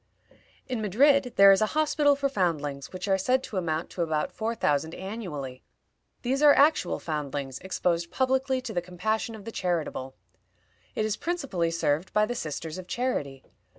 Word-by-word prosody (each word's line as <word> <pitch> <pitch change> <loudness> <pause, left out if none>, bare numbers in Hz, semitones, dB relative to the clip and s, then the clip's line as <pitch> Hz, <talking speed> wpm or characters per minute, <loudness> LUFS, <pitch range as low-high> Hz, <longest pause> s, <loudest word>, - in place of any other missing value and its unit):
In 250 -4 -2
Madrid 255 +5 +3
there 195 0 +9
is 195 - +4
a 215 - +3
hospital 295 -2 +3
for 280 0 0
foundlings, 150 - -2
which 185 +1 -5
are 190 -1 +2
said 255 +6 +2
to 205 - -6
amount 165 -2 -2
to 180 - -4
about 155 -2 0
four 225 +1 -3
thousand 150 -4 0
annually. 165 - -6 0.6
These 265 +3 0
are 295 -1 +7
actual 285 - +3
foundlings, 140 -4 -4
exposed 170 -2 -1
publicly 260 0 +1
to 255 - -6
the 175 - 0
compassion 215 +6 -2
of 210 -2 -11
the 230 - -5
charitable. 165 -9 -2 0.8
It 215 - 0
is 215 -1 -1
principally 275 - -1
served 165 0 0
by 210 0 +4
the 245 - -3
Sisters 160 -4 -5
of 180 - -9
Charity. 145 - -2
190 Hz, 170 wpm, -27 LUFS, 160-250 Hz, 0.8 s, there